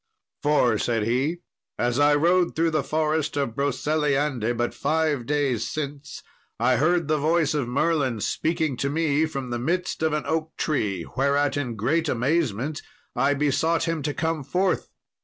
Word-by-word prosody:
"For," 125 Hz, -7 st, +3 dB
said 115 Hz, -3 st, 0 dB
he, 135 Hz, +10 st, 0 dB, 0.4 s
"as 120 Hz, +2 st, 0 dB
I 145 Hz, 0 st, +5 dB
rode 175 Hz, +4 st, +2 dB
through 165 Hz, +1 st, +2 dB
the 155 Hz, -2 st, +1 dB
forest 155 Hz, +1 st, -1 dB
of 140 Hz, -5 st, -1 dB
Broceliande 140 Hz, -4 st, 0 dB
but 120 Hz, 0 st, -1 dB
five 150 Hz, -4 st, 0 dB
days 140 Hz, -6 st, 0 dB
since, 145 Hz, -1 st, -6 dB, 0.4 s
I 125 Hz, +2 st, +3 dB
heard 170 Hz, +3 st, +2 dB
the 155 Hz, 0 st, +1 dB
voice 155 Hz, 0 st, +2 dB
of 145 Hz, -5 st, -1 dB
Merlin 135 Hz, -2 st, 0 dB
speaking 155 Hz, +3 st, -1 dB
to 140 Hz, -, -1 dB
me 155 Hz, 0 st, +1 dB
from 135 Hz, -5 st, -5 dB
the 120 Hz, -, -2 dB
midst 175 Hz, +9 st, -1 dB
of 160 Hz, -1 st, +1 dB
an 150 Hz, -, -1 dB
oak 160 Hz, 0 st, -2 dB
tree, 105 Hz, -, -1 dB
whereat, 140 Hz, +2 st, +2 dB
in 130 Hz, -5 st, -2 dB
great 155 Hz, +9 st, 0 dB
amazement, 140 Hz, +1 st, 0 dB, 0.3 s
I 135 Hz, +3 st, +2 dB
besought 150 Hz, +3 st, +1 dB
him 165 Hz, -2 st, -1 dB
to 145 Hz, +1 st, -2 dB
come 160 Hz, -2 st, -1 dB
forth. 185 Hz, +6 st, 0 dB
145 Hz, 160 wpm, -25 LUFS, 130-160 Hz, 0.4 s, I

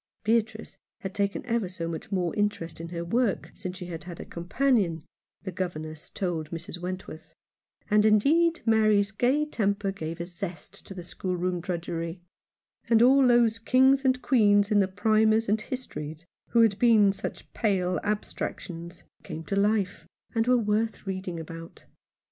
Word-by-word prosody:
Beatrice 220 Hz, 0 st, 0 dB, 0.2 s
had 190 Hz, -1 st, -5 dB
taken 200 Hz, +3 st, -1 dB
ever 230 Hz, -5 st, 0 dB
so 170 Hz, -2 st, -5 dB
much 165 Hz, +3 st, -6 dB
more 180 Hz, -3 st, 0 dB
interest 205 Hz, -6 st, -2 dB
in 165 Hz, -, -6 dB
her 170 Hz, 0 st, -4 dB
work 230 Hz, +3 st, 0 dB
since 185 Hz, -1 st, -6 dB
she 180 Hz, -, -7 dB
had 170 Hz, -1 st, -7 dB
had 175 Hz, -2 st, -8 dB
a -, -, -6 dB
companion, 180 Hz, -, 0 dB, 0.4 s
the 190 Hz, -, -4 dB
governess 155 Hz, -3 st, -5 dB
told 165 Hz, -5 st, -3 dB
Mrs. 170 Hz, +2 st, -6 dB
Wentworth; 180 Hz, -2 st, -7 dB, 0.5 s
and 210 Hz, 0 st, +4 dB
indeed 310 Hz, +11 st, +3 dB
Mary's 215 Hz, -3 st, +3 dB
gay 255 Hz, +8 st, +2 dB
temper 200 Hz, -7 st, -1 dB
gave 165 Hz, -3 st, -6 dB
a 170 Hz, -, -3 dB
zest 180 Hz, +1 st, -8 dB
to 195 Hz, -, -8 dB
the 180 Hz, -, -7 dB
schoolroom 180 Hz, 0 st, -2 dB
drudgery; 170 Hz, 0 st, -4 dB, 0.7 s
and 230 Hz, 0 st, +6 dB
all 265 Hz, +1 st, +6 dB
those 235 Hz, -2 st, +4 dB
kings 265 Hz, +4 st, +4 dB
and 260 Hz, -1 st, +1 dB
queens 205 Hz, -4 st, +4 dB
in 210 Hz, -, +5 dB
the 195 Hz, -, +3 dB
Primers 215 Hz, +3 st, +2 dB
and 215 Hz, +2 st, +1 dB
Histories 160 Hz, -, -6 dB, 0.2 s
who 235 Hz, -, +4 dB
had 215 Hz, -3 st, +2 dB
been 215 Hz, -5 st, +5 dB
such -, -, -7 dB
pale 185 Hz, -5 st, +1 dB
abstractions 175 Hz, -4 st, -4 dB, 0.2 s
came 160 Hz, -3 st, -7 dB
to 195 Hz, -, -3 dB
life, 200 Hz, -1 st, 0 dB, 0.3 s
and 225 Hz, 0 st, +1 dB
were 250 Hz, 0 st, +5 dB
worth 220 Hz, 0 st, -1 dB
reading 185 Hz, -3 st, -4 dB
about. 165 Hz, +1 st, -10 dB
200 Hz, 160 wpm, -27 LUFS, 175-220 Hz, 0.7 s, and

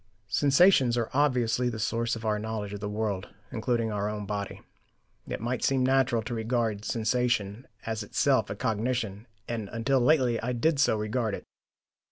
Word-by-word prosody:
Sensations 140 Hz, -, +4 dB
are 115 Hz, -2 st, -1 dB
obviously 125 Hz, -3 st, +2 dB
the 110 Hz, -, -5 dB
source 115 Hz, +2 st, 0 dB
of 115 Hz, 0 st, -7 dB
our 105 Hz, -1 st, +1 dB
knowledge 105 Hz, -2 st, -4 dB
of 100 Hz, -, -5 dB
the 105 Hz, 0 st, -4 dB
world, 105 Hz, -2 st, -2 dB, 0.2 s
including 115 Hz, 0 st, 0 dB
our 105 Hz, 0 st, -1 dB
own 105 Hz, -1 st, -4 dB
body. 100 Hz, -1 st, -4 dB, 0.7 s
It -, -, -4 dB
might 120 Hz, +3 st, -2 dB
seem 135 Hz, -2 st, +2 dB
natural 130 Hz, -3 st, +2 dB
to 120 Hz, +2 st, -5 dB
regard 115 Hz, -2 st, -1 dB
a -, -, -11 dB
sensation 115 Hz, -1 st, 0 dB, 0.2 s
as 110 Hz, -1 st, -2 dB
itself 110 Hz, +2 st, +1 dB
a -, -, -3 dB
cognition, 110 Hz, -2 st, -2 dB, 0.2 s
and 110 Hz, -4 st, -4 dB
until 130 Hz, +4 st, +1 dB
lately 125 Hz, -3 st, +3 dB
I 125 Hz, +2 st, -2 dB
did 140 Hz, +5 st, +1 dB
so 125 Hz, -5 st, +3 dB
regard 105 Hz, 0 st, -1 dB
it. -, -, -9 dB
115 Hz, 175 wpm, -28 LUFS, 105-125 Hz, 0.7 s, Sensations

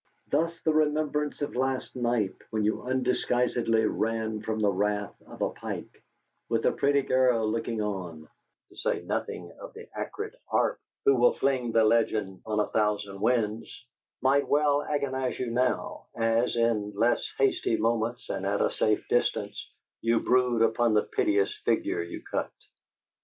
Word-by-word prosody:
Thus, 165 Hz, +1 st, +1 dB
the 160 Hz, -, +2 dB
remembrance 150 Hz, -1 st, 0 dB
of 145 Hz, -, -4 dB
last 130 Hz, +1 st, -1 dB
night, 120 Hz, -5 st, 0 dB, 0.2 s
when 110 Hz, -1 st, -1 dB
you 110 Hz, -, 0 dB
undisguisedly 125 Hz, -3 st, +1 dB
ran 110 Hz, 0 st, -1 dB
from 110 Hz, 0 st, -3 dB
the 105 Hz, -2 st, +3 dB
wrath 105 Hz, +1 st, -1 dB
of -, -, -5 dB
a -, -, 0 dB
Pike, -, -, -7 dB, 0.5 s
with 115 Hz, -1 st, 0 dB
a -, -, +5 dB
pretty 140 Hz, 0 st, +2 dB
girl 125 Hz, -4 st, +3 dB
looking 115 Hz, 0 st, -1 dB
on 90 Hz, -6 st, -5 dB, 0.4 s
(to -, -, -19 dB
say -, -, -1 dB
nothing -, -, -4 dB
of -, -, -10 dB
the -, -, -10 dB
acrid -, -, -5 dB
Arp, -, -, +1 dB, 0.3 s
who 140 Hz, -, +6 dB
will 120 Hz, -1 st, +5 dB
fling 130 Hz, -4 st, 0 dB
the 115 Hz, 0 st, +4 dB
legend 110 Hz, -4 st, +1 dB
on 105 Hz, -1 st, 0 dB
a 105 Hz, -, +3 dB
thousand 105 Hz, -2 st, 0 dB
winds), 115 Hz, 0 st, -1 dB, 0.4 s
might 140 Hz, +2 st, +3 dB
well 145 Hz, 0 st, +3 dB
agonize 135 Hz, -3 st, -2 dB
you 125 Hz, -2 st, -3 dB
now, 125 Hz, +1 st, -1 dB
as, 115 Hz, +1 st, +1 dB
in 115 Hz, -3 st, +1 dB
less 115 Hz, +4 st, +1 dB
hasty 135 Hz, -4 st, +2 dB
moments 115 Hz, +1 st, -1 dB
and 95 Hz, -, -3 dB
at 100 Hz, +1 st, 0 dB
a -, -, +2 dB
safe 110 Hz, -1 st, +1 dB
distance, -, -, -1 dB, 0.3 s
you 115 Hz, 0 st, +2 dB
brood 125 Hz, -2 st, +3 dB
upon 115 Hz, 0 st, +2 dB
the 105 Hz, -, +4 dB
piteous 100 Hz, -1 st, +1 dB
figure -, -, +1 dB
you 85 Hz, -, -7 dB
cut. -, -, -2 dB
115 Hz, 160 wpm, -28 LUFS, 105-130 Hz, 0.5 s, who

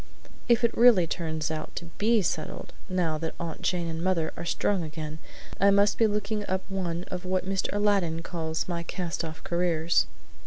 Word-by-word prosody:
If 240 Hz, 0 st, +5 dB
it 235 Hz, -, +2 dB
really 230 Hz, -7 st, +7 dB
turns 160 Hz, -2 st, -2 dB
out 155 Hz, -1 st, -5 dB
to 170 Hz, -1 st, -6 dB
BE 220 Hz, 0 st, +4 dB
settled, -, -, -3 dB, 0.2 s
now 170 Hz, -4 st, 0 dB
that 160 Hz, 0 st, -4 dB
Aunt 170 Hz, -1 st, -5 dB
Jane 175 Hz, -2 st, 0 dB
and 165 Hz, 0 st, -3 dB
mother 180 Hz, -4 st, +1 dB
are -, -, -6 dB
strong 190 Hz, +2 st, +1 dB
again 155 Hz, -1 st, -5 dB, 0.4 s
I 200 Hz, -, +6 dB
must 200 Hz, +1 st, +4 dB
be 225 Hz, -, +6 dB
looking 210 Hz, 0 st, -1 dB
up 190 Hz, 0 st, -1 dB
one 180 Hz, -3 st, -2 dB
of 180 Hz, 0 st, -4 dB
what 185 Hz, 0 st, -1 dB
Mr. 195 Hz, 0 st, 0 dB
Aladdin 200 Hz, -6 st, +1 dB
calls 160 Hz, -2 st, -3 dB
my 170 Hz, -2 st, -2 dB
cast 175 Hz, 0 st, -3 dB
off 160 Hz, -1 st, -7 dB
careers." 170 Hz, -3 st, +2 dB
175 Hz, 185 wpm, -28 LUFS, 165-195 Hz, 0.4 s, really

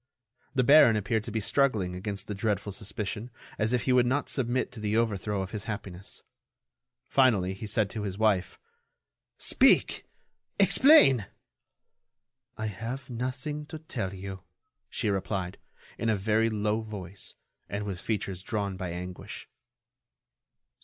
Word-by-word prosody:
The 130 Hz, -, +3 dB
baron 130 Hz, -3 st, +7 dB
appeared 105 Hz, +1 st, 0 dB
to 115 Hz, -, -5 dB
be 110 Hz, -, -1 dB
struggling 110 Hz, -6 st, +1 dB
against 100 Hz, +2 st, -4 dB
the 105 Hz, -, -4 dB
dreadful 100 Hz, 0 st, -1 dB
suspicion, 105 Hz, +3 st, -4 dB, 0.3 s
as 110 Hz, +1 st, +1 dB
if 125 Hz, -1 st, +1 dB
he 130 Hz, -, +2 dB
would 125 Hz, -1 st, +4 dB
not 140 Hz, +3 st, 0 dB
submit 130 Hz, -1 st, +1 dB
to 125 Hz, -, -8 dB
the 105 Hz, +1 st, 0 dB
overthrow 105 Hz, -3 st, 0 dB
of 95 Hz, -, -7 dB
his 105 Hz, 0 st, -4 dB
happiness. 100 Hz, -4 st, -7 dB, 0.8 s
Finally, 105 Hz, -9 st, +3 dB
he 100 Hz, +3 st, -7 dB
said 105 Hz, 0 st, +2 dB
to 110 Hz, -, -4 dB
his 100 Hz, -2 st, -4 dB
wife: 105 Hz, -4 st, +1 dB, 0.8 s
"Speak! -, -, +3 dB, 0.5 s
Explain!" 135 Hz, -, +6 dB, 1.3 s
"I 110 Hz, -, -3 dB
have 115 Hz, +6 st, -5 dB
nothing 130 Hz, +5 st, -4 dB
to 160 Hz, -, -7 dB
tell 120 Hz, -11 st, -4 dB
you," 95 Hz, 0 st, -7 dB, 0.5 s
she 105 Hz, -, -1 dB
replied, 95 Hz, -2 st, -3 dB, 0.4 s
in 115 Hz, -, 0 dB
a 110 Hz, -, +2 dB
very 110 Hz, +3 st, +2 dB
low 105 Hz, 0 st, 0 dB
voice, 100 Hz, -4 st, -8 dB, 0.3 s
and 100 Hz, +2 st, -3 dB
with 95 Hz, -3 st, -4 dB
features 100 Hz, -4 st, -3 dB
drawn 100 Hz, -2 st, -3 dB
by 95 Hz, -2 st, -4 dB
anguish. 90 Hz, +1 st, -7 dB
105 Hz, 140 wpm, -28 LUFS, 95-120 Hz, 1.3 s, baron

